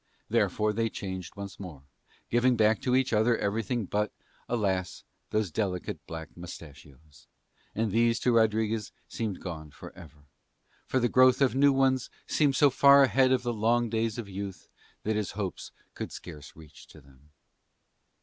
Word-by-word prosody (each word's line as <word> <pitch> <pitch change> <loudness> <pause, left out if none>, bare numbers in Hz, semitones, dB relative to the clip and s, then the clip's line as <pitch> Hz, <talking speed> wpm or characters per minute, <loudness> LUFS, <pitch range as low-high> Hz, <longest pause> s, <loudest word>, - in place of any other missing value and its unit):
Therefore 105 0 +1
they 115 +1 0
changed 95 -4 -6
once 100 -1 -8
more, 85 -8 -9 0.5
giving 120 +1 +3
back 110 -1 +3
to 125 -1 +1
each 130 -2 +1
other 110 +2 +3
everything 110 +2 -1
but, 105 +3 -1 0.4
alas, 95 -6 -1 0.3
those 105 -4 -1
delicate 90 -2 -3
black 80 -1 -8
moustachios; 75 -4 -13 0.5
and 110 -1 0
these 115 +2 +2
to 125 - +2
Rodriguez 110 -1 +1 0.2
seemed 105 -5 -4
gone 80 -4 -6
for - - -12
ever, 80 -5 -15 0.6
for 130 - +1
the 120 - +2
growth 130 +1 +5
of 135 -3 +3
new 140 +2 +5
ones 135 -1 +1 0.2
seemed 145 -3 +2
so 145 +1 +5
far 140 +2 +7
ahead 130 0 +3
to 130 - +4
the 120 -1 -3
long 115 +1 +1
days 115 -1 -1
of 115 -4 -5
youth 100 0 -7 0.3
that 110 +1 -1
his 105 -2 -2
hopes 100 -3 -5 0.2
could - - -6
scarce 75 -2 -10
reach 80 -2 -15
to 80 - -15
them. 70 +1 -22
110 Hz, 160 wpm, -28 LUFS, 90-120 Hz, 0.6 s, far